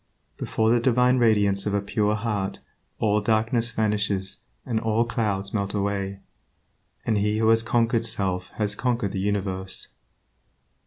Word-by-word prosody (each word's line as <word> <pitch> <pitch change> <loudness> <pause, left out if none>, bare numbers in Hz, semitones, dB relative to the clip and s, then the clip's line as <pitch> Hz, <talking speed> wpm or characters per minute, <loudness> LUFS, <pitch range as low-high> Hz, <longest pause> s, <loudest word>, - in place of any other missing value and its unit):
Before 110 0 0
the 120 - +4
divine 125 +1 +3
radiance 105 -4 +2
of 100 - 0
a - - +2
pure 105 +1 0
heart 105 -3 -2 0.4
all 105 -1 +2
darkness 115 +2 +1
vanishes 105 -3 -1 0.3
and 115 -3 0
all 110 +1 +1
clouds 100 -4 -2
melt 100 -1 -1
away, 100 -1 -2 0.8
and 110 -3 +1
he 105 +1 +1
who 110 0 +3
has 115 0 +5
conquered 115 0 +1
self 95 -5 0
has 105 -2 0
conquered 120 -2 -1
the 100 - -3
universe. 95 -2 -1
105 Hz, 145 wpm, -25 LUFS, 100-115 Hz, 0.8 s, has